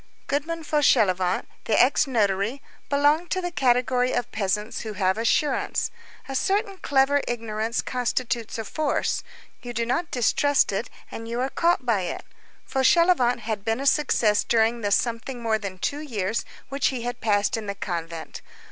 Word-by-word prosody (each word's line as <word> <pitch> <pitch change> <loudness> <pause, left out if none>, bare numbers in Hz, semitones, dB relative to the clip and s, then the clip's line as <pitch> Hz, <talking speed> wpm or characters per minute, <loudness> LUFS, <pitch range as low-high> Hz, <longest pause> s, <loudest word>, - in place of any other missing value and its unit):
Goodman 320 +4 -2
Fauchelevent, 190 - +2 0.2
the 220 - +2
ex 270 +3 +4
notary, 210 0 0 0.3
belonged 290 +4 +2
to 375 - 0
the 355 -1 -3
category 250 -3 +2
of 240 - -2
peasants 210 +1 -2
who 220 -1 -5
have 190 -1 +1
assurance. 230 +7 0 0.4
A 270 - -5
certain 395 - 0
clever 280 0 +3
ignorance 225 -1 -2
constitutes 240 -2 -2
a 225 - -4
force; 305 +5 -1 0.4
you 240 -1 -7
do 230 0 -1
not 310 +8 -1
distrust 280 +3 +2
it, - - -3 0.2
and 225 - -7
you 235 +1 -3
are 260 +2 0
caught 335 -6 +1
by 225 -5 +2
it. 180 - -5 0.4
Fauchelevent 265 -3 +3
had 215 -3 -3
been 225 +2 0
a 275 - -4
success 265 -7 +3
during 230 0 +2
the 205 - 0
something 235 +4 0
more 225 -2 0
than 195 -3 -6
two 285 +10 -2
years 225 -8 -2 0.2
which 275 +1 +1
he 250 -3 -2
had 245 0 -4
passed 205 +1 +2
in 220 -2 -5
the 200 - -3
convent. 170 -4 -5
240 Hz, 165 wpm, -25 LUFS, 215-280 Hz, 0.4 s, ex